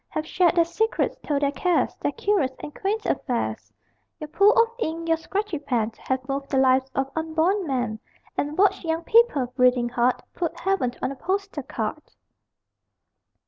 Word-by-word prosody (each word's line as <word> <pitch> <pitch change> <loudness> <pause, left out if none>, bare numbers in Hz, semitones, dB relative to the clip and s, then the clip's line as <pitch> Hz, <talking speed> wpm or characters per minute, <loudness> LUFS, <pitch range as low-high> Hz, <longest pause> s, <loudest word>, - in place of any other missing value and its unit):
Have 310 - -3
shared 350 +1 +2
their 340 -1 +4
secrets, 445 +7 0
told 290 -1 -1
their 280 - +2
cares, 350 +5 +1
Their - - -1
curious 355 -11 +1
and 295 - -6
quaint 420 +3 -2
affairs! 245 -4 -2 0.5
Your 305 - -7
pool 400 +6 +5
of 460 0 +5
ink, 330 -4 -3
your 325 0 +3
scratchy 390 0 -3
pen, 240 -6 -1
Have 260 0 -2
moved 275 0 -3
the 270 - 0
lives 260 0 +3
of 270 0 -1
unborn 325 +4 0
men, 245 -5 -1 0.4
And 295 +1 -2
watched 390 0 +3
young 325 0 -1
people, 305 - +3
breathing 250 -2 +3
hard, 245 +1 +1
Put 340 -3 -3
Heaven 375 -10 0
on - - 0
a - - -6
postal 390 0 -2
card. 235 +3 -4
310 Hz, 170 wpm, -24 LUFS, 260-370 Hz, 0.5 s, pool